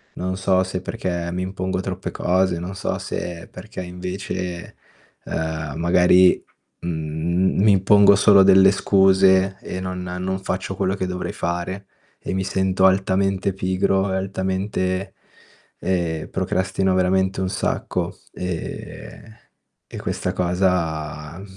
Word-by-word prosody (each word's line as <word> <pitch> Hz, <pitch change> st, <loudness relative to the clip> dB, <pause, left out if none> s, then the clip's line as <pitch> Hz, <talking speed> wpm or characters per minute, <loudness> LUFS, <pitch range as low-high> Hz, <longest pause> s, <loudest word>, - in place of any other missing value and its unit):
Non 95 Hz, +1 st, -3 dB
so 95 Hz, -1 st, +2 dB
se 95 Hz, 0 st, -4 dB
perché 85 Hz, -1 st, -3 dB
mi 90 Hz, +1 st, -2 dB
impongo 95 Hz, 0 st, -3 dB
troppe -, -, -4 dB
cose, 90 Hz, 0 st, +1 dB
non 90 Hz, +3 st, -5 dB
so 95 Hz, -, -2 dB
se 85 Hz, -1 st, -5 dB
perché -, -, -8 dB
invece, 90 Hz, 0 st, -5 dB, 0.5 s
ehm, 80 Hz, -2 st, -3 dB
magari, 90 Hz, +1 st, +4 dB, 0.4 s
mhmm, 85 Hz, +3 st, -1 dB
mi 105 Hz, -, +6 dB
impongo 100 Hz, +1 st, +6 dB
solo 100 Hz, 0 st, +6 dB
delle 95 Hz, 0 st, +7 dB
scuse 95 Hz, -1 st, +4 dB
e 90 Hz, -, -5 dB
non 90 Hz, 0 st, -4 dB
non 90 Hz, +1 st, -3 dB
faccio 95 Hz, 0 st, -3 dB
quello 95 Hz, 0 st, 0 dB
che 95 Hz, -, -2 dB
dovrei 90 Hz, 0 st, -4 dB
fare, 90 Hz, +3 st, -4 dB, 0.3 s
e -, -, -5 dB
mi 95 Hz, 0 st, -1 dB
sento 95 Hz, 0 st, +1 dB
altamente 95 Hz, +1 st, +2 dB
pigro 95 Hz, +1 st, 0 dB
e -, -, 0 dB
altamente 95 Hz, 0 st, -2 dB, 0.7 s
ehm, 85 Hz, -4 st, -2 dB
procrastino 95 Hz, 0 st, 0 dB
veramente 95 Hz, +1 st, +1 dB
un 95 Hz, -, -1 dB
sacco, 95 Hz, -, -2 dB, 0.2 s
ehm, 90 Hz, +4 st, -7 dB, 0.5 s
e -, -, -9 dB
questa -, -, -3 dB
cosa, 85 Hz, -4 st, -1 dB
mhmm, 100 Hz, -, -9 dB
95 Hz, 130 wpm, -22 LUFS, 90-95 Hz, 0.7 s, delle